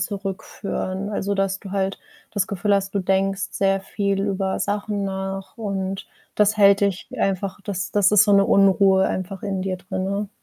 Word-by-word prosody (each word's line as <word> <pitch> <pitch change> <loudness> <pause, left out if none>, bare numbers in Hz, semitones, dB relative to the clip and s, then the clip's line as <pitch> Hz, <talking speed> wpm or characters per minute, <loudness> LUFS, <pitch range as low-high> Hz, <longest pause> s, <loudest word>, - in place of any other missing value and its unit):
zurückführen. 195 -1 -4
Also, 200 -1 -1
dass 195 0 0
du 195 - -9
halt 195 0 -1 0.4
das 205 -3 0
Gefühl 200 +1 +1
hast, 195 0 -1
du 200 - 0
denkst 195 +1 0
sehr 195 0 +1
viel 200 0 -1
über 195 -1 -1
Sachen 205 0 -2
nach 195 0 -5
und 195 -3 -3 0.3
das 210 +1 +3
hält 200 -1 +6
dich 200 -2 0
einfach 195 +1 -1
das 195 -1 -4
das 205 -1 +4
ist 210 0 +6
so 205 - +3
'ne 200 0 +6
Unruhe 195 -1 +4
einfach 190 +1 -4
in 195 -2 -2
dir 190 -1 -2
drinne. 190 +2 -3
195 Hz, 175 wpm, -22 LUFS, 190-200 Hz, 0.4 s, hält